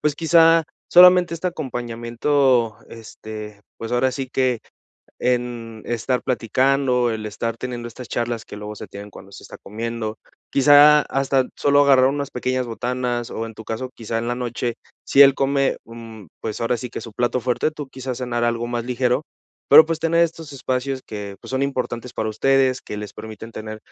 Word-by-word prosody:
pues 150 -1 0
quizá 165 0 +5 0.2
solamente 180 -1 +7
este 170 +2 -4
acompañamiento, 120 -4 0
este, 110 -2 -9 0.2
pues, 115 - -6
ahora 130 +2 +2
sí 135 0 -4
que 130 -2 0 0.6
en 120 -3 -2
estar 120 +1 -1
platicando, 130 0 +1
el 110 -1 -4
estar 115 +3 -4
teniendo 120 -1 -5
estas 120 +1 -10
charlas 120 -1 -2
que - - -9
luego 105 0 -7
se - - -9
tienen 100 +1 -10
cuando 95 0 -13
se - - -11
está - - -11
comiendo, 110 +1 -5 0.3
quizá 145 +2 +7
hasta 135 -1 0
solo 145 0 +3
agarrar 135 -2 +5
unas 140 +1 -1
pequeñas 130 0 -2
botanas 120 0 -3
o 115 - -4
en 115 - -9
tu 110 - -11
caso 115 +4 -5
quizá 115 0 -5
en 115 - -3
la 120 - 0
noche 120 -1 -3 0.3
si 140 - +3
él 135 -1 +7
come, 135 0 +1
mm, 115 -3 -11
pues 110 0 -5
ahora 115 +1 0
sí 125 - -6
que - - -6
su 115 - -10
plato 120 +3 0
fuerte 125 +5 0
tú 150 -3 -8
quizás 130 -2 -6
cenar 120 -2 -2
algo 120 0 -1
más 120 -1 -3
ligero 125 +2 0 0.5
pero, 155 +2 +9
pues, 165 -1 -2
tener 170 +1 +3
estos 160 -2 -6
espacios 130 0 -2
que, 100 -2 -7
pues, - - -11
son 130 +1 0
importantes 125 -3 -3
para 110 - -2
ustedes 130 +3 +2
que 105 - -7
les 105 0 -7
permiten 110 +1 -9
tener, 110 0 -7
125 Hz, 185 wpm, -21 LUFS, 115-135 Hz, 0.6 s, pero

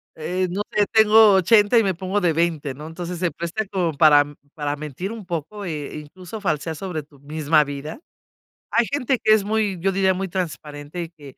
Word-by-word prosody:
eh, 180 +4 -2
no 190 +4 -2
sé 210 - +2
tengo 220 -1 +6
80 205 +4 +4
y 225 - +5
me 195 -2 +1
pongo 190 +4 -2
de 175 -3 +2
20 160 -4 -1
¿no? 150 +4 -9
Entonces, 175 +1 -6
se 175 -2 0
presta 170 +6 -4
como 180 -5 -1
para, 145 -1 +6
mm, 145 0 -13 0.2
para 145 -1 -3
mentir 155 +6 -6
un 225 -3 -8
poco, 175 +4 -5
e 150 -5 -5
incluso 180 +7 -9
falsear 160 -3 -2
sobre 175 -2 -5
tu 145 -1 -22
misma 150 +1 +2
vida. 145 - -7 0.7
Hay 235 0 +3
gente 265 -1 -1
que 215 - +5
es 215 -2 +3
muy, 210 -2 0
yo 195 +3 +1
diría, 190 0 +2
muy 190 +1 -3
transparente 155 -3 -5
y 165 - -8
que, 145 -5 -14
175 Hz, 205 wpm, -22 LUFS, 150-200 Hz, 0.7 s, tengo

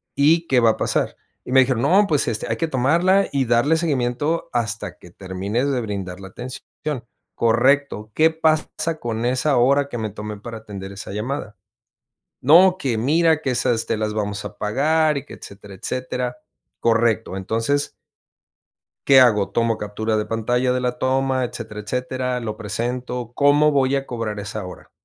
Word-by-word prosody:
"¿Y 165 +4 +3
qué 130 -2 +3
va 115 -2 +5
a - - -5
pasar?". - - -1 0.3
Y - - -5
me 130 - +7
dijeron: 125 -2 +1
"No, 190 +8 +5
pues 150 -3 +1
este, 110 -2 -2
hay - - -1
que 165 - -1
tomarla 170 +9 +2
y 135 -2 +1
darle 120 +7 +3
seguimiento 145 0 -1
hasta 115 -2 -2
que 90 - -16
termines 100 +8 -3
de 130 - 0
brindar 95 -4 -5
la 95 -1 -9
atención. 130 +5 -8 0.7
'Correcto. 120 -1 +2
¿Qué 160 +1 +4
pasa 160 0 0
con 115 0 -3
esa 130 +2 +1
hora 140 +3 +3
que 120 - -5
me 110 -1 -2
tomé 105 0 -7
para 115 +2 -8
atender 100 -2 -8
esa 100 0 -8
llamada?' 105 0 -4 0.9
No, 180 +7 +6
que 125 -7 -1
mira 160 +5 +2
que 135 - 0
esas 115 -2 +1
te 110 - 0
las 105 0 -2
vamos 105 -1 -3
a - - -8
pagar". 150 +7 +1
Y 135 - -5
que - - -12
etcétera, 100 0 -11
etcétera. 125 +4 -3 0.4
Correcto, 115 -3 +1
entonces 115 +9 -1 1.1
"¿qué 135 -1 +7
hago? 105 -6 +4
¿Tomo 115 -1 +1
captura 110 +1 -2
de 105 - -1
pantalla 125 +3 0
de 125 - -1
la 125 0 -2
toma, 130 0 +1
etcétera, 110 -3 -7
etcétera? 125 +2 -2
¿Lo 110 -3 -5
presento? 120 +3 -4
¿Cómo 145 +1 +4
voy 135 -1 +2
a 135 0 -2
cobrar 115 -3 -4
esa 105 0 -5
hora, 90 - -11
125 Hz, 170 wpm, -21 LUFS, 110-140 Hz, 1.1 s, me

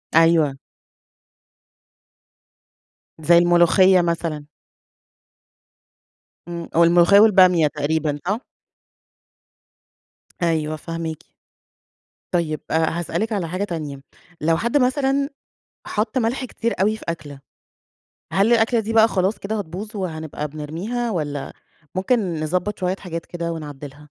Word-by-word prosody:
أيوه. 165 -4 +4 2.6
زي 170 +2 +5
الملوخية 175 +2 +5
مثلًا. 165 -3 -2 2.0
امم 170 -1 -6
والملوخية 175 +3 +6
والبامية 185 -7 +6
تقريبًا 150 0 -1
صح؟ 210 +7 -2 2.0
أيوه 155 -2 0
فاهماكِ. 165 0 -6 1.1
طيب 160 -4 -1
هاسألِك 170 +7 -1
على 190 -5 -2
حاجة 185 +4 -3
تانية، 155 -7 -5 0.4
لو 160 +1 +2
حد 235 +8 +1
مثلًا 275 +1 +1 0.6
حطّ 220 +4 -1
ملح 245 +3 -1
كتير 235 -1 -3
أوي 215 +3 +2
في - - -13
أكلة، 145 -4 -6 0.9
هل 200 +5 +3
الأكلة 230 0 +3
دي 220 +1 -4
بقى 225 0 +6
خلاص 190 +2 0
كده 215 +2 -3
هتبوظ 205 +4 -6
وهنبقى 160 -5 -4
بنرميها، 170 +12 -4
والّا 145 -7 -3 0.4
ممكن 185 -4 0
نضبط 180 +6 -2
شوية 185 0 -1
حاجات 170 -3 -6
كده 170 -1 -4
ونعدّلها؟ 145 -3 -8
175 Hz, 100 wpm, -21 LUFS, 160-210 Hz, 2.6 s, والملوخية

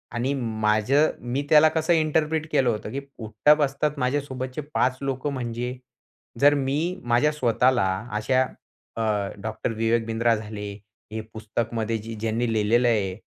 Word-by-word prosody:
आणि 125 +4 0
माझं 115 +3 +2
मी 125 +3 -2
त्याला 155 0 +7
कसं 160 +2 +1
इंटरप्रिट 155 0 +1
केलं 130 -2 +3
होतं, 110 -2 -3
की 140 - -3 0.2
उठता-बसतात 140 +6 +1
माझ्या 130 +3 +1
सोबतचे 130 0 -5
5 130 +1 +1
लोकं 135 +1 -2
म्हणजे? 125 0 -4 0.6
जर 145 +2 +6
मी 150 +7 -1
माझ्या 120 +5 +3
स्वतःला 125 -5 +2 0.3
अशा 130 +4 +2 0.5
अ, 115 - -3 0.4
डॉक्टर 110 +2 -3
विवेक 115 +1 +1
बिंद्रा 115 +1 +2
झाले, 105 -1 -6 0.4
हे 110 - -4
पुस्तकमध्ये 115 +1 -2
जे 110 +1 -7
ज्यांनी 115 +2 -1
लिहिलेलं 115 +3 +3
आहे, 100 -5 +1
125 Hz, 140 wpm, -25 LUFS, 115-140 Hz, 0.6 s, त्याला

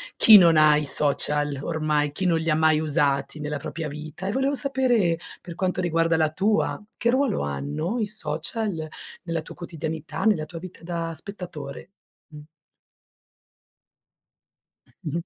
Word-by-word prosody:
chi 215 -2 +9
non 170 -3 +6
ha 150 -1 +6
i 150 - -1
social 145 0 +1
ormai, 150 -2 0
chi 185 +6 -4
non 170 -2 +3
li 165 0 0
mai 155 0 +3
usati 150 -1 0
nella 150 0 -3
propria 160 +2 -5
vita? 155 +4 -8
E - - 0
volevo 270 +4 0
sapere, 250 - +1 0.2
per 170 -1 -8
quanto 185 0 -1
riguarda 165 -1 +2
la 155 -1 +2
tua, 205 +8 0 0.2
che 235 - +1
ruolo 260 -5 +1
hanno 70 - -3
i 220 - +1
social 210 -4 -4 0.4
nella 165 -2 -2
tua - - -11
quotidianità, 160 -2 -5
nella 200 -9 +2
tua 165 +1 -8
vita 185 +1 -10
da 165 -1 -3
spettatore, 170 -5 -8 0.4
mh. 150 -2 -11 2.6
Mh-mh. 165 +3 -3
165 Hz, 145 wpm, -24 LUFS, 150-185 Hz, 2.6 s, chi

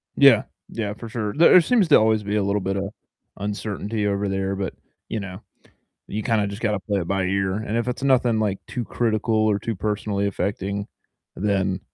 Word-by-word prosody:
Yeah, 135 -6 +7 0.3
yeah, 105 -3 -3
for 115 +1 -9
sure. 110 -2 -3
There, 165 +3 +6
uh, 180 - +9
seems 210 -1 +3
to - - +8
always 110 -1 +2
be 105 +1 -2
a 105 - +2
little 100 0 0
bit 95 +1 -1
of 100 +1 -2 0.5
uncertainty 105 +1 -3
over 100 0 0
there, 95 0 -1
but, 95 -2 -3 0.3
you 110 - -3
know, 95 0 -7 0.7
you 105 +1 -4
kinda 110 -3 +1
just 100 +3 -6
gotta 105 -3 0
play 100 -1 -1
it 85 - -5
by 95 -1 0
ear, 95 0 0
and 110 +1 -3
if 120 +1 0
it's 125 - -3
nothing, 125 -4 +3
like, 100 -3 -1
too 125 -3 -4
critical 115 -1 0
or 110 -2 +3
too 115 +1 -3
personally 100 0 -1
affecting, 100 +1 -2 0.5
then 95 -2 0
105 Hz, 200 wpm, -23 LUFS, 100-110 Hz, 0.7 s, uh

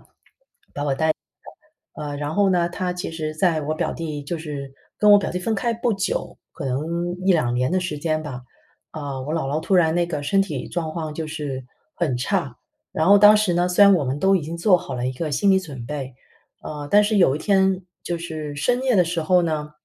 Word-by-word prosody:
带 - - -24
大， - - -35 1.7
呃， 145 - -4
然 145 +2 -4
后 200 -1 +3
呢， 175 -2 +2
她 180 0 -3
其 180 -2 -5
实 155 -1 -4
在 165 -2 +1
我 155 +2 -2
表 - - -2
弟 155 -3 -5
就 155 +5 -4
是 145 -4 -6 0.3
跟 210 0 +5
我 205 - +9
表 200 - -3
弟 180 - -2
分 220 +5 -1
开 235 +3 0
不 235 0 0
久， 175 -2 -3 0.2
可 160 - -7
能 165 +7 -2
1-2 155 -11 +2
年 125 +6 0
的 185 - +2
时 165 -5 -4
间 155 0 -1
吧， 130 -4 -7 0.5
啊， 140 -4 -5
我 150 +4 -4
姥 160 -5 -1
姥 150 +3 -1
突 190 - 0
然 165 -3 +4
那 175 0 +1
个 150 -4 -4
身 195 +7 +2
体 150 -9 -5
状 165 -2 -3
况 155 -2 -4
就 160 0 -4
是 145 -4 -5 0.3
很 150 -8 -1
差。 140 - -2 0.4
然 160 - 0
后 205 +1 +8
当 210 +1 +8
时 210 -4 +1
呢， 175 +1 +2
虽 180 +3 +5
然 200 - +7
我 150 -6 +1
们 130 +2 -2
都 195 +4 +4
已 175 - -2
经 165 +3 -5
做 180 +2 +4
好 135 -6 -6
了 125 0 -2
一 130 - -1
个 155 +4 -4
心 200 +7 +3
理 190 - +5
准 140 -10 -8
备， 135 -3 -5 0.5
呃， 150 -1 -6
但 205 +1 +6
是 210 0 +1
有 160 -8 +4
一 - - -3
天 190 +1 +2 0.2
就 175 - -3
是 155 -3 -6
深 245 - 0
夜 255 -3 +2
的 180 - +5
时 170 0 -2
候 180 +3 +3
呢， 155 -2 -2
165 Hz, 245 characters per minute, -22 LUFS, 145-185 Hz, 1.7 s, 我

